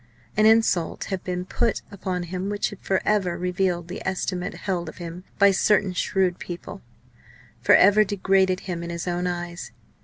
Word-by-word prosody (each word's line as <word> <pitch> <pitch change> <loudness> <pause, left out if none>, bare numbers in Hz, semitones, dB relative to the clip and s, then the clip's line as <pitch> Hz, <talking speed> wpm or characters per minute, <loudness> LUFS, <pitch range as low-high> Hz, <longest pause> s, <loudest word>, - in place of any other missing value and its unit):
An 215 +1 +5
insult 220 -7 +3
had 190 -2 -3
been 180 0 -3
put 230 +4 -1
upon 185 -2 -3
him 185 +3 -4
which 205 0 -1
had 205 - -10
for 190 -1 -1
ever 195 -5 +1
revealed 180 -1 -1
the 180 - -6
estimate 185 -1 -2
held 180 -3 -3
of - - -12
him 175 +1 -8
by 200 -1 +6
certain 195 0 +2
shrewd 185 0 0
people, 180 +3 -7 0.8
for - - +6
ever 205 +3 +6
degraded 190 -2 +1
him 175 -3 -4
in 170 - -5
his 170 +1 -5
own 175 0 -1
eyes. 175 0 -5
185 Hz, 175 wpm, -24 LUFS, 175-195 Hz, 0.8 s, by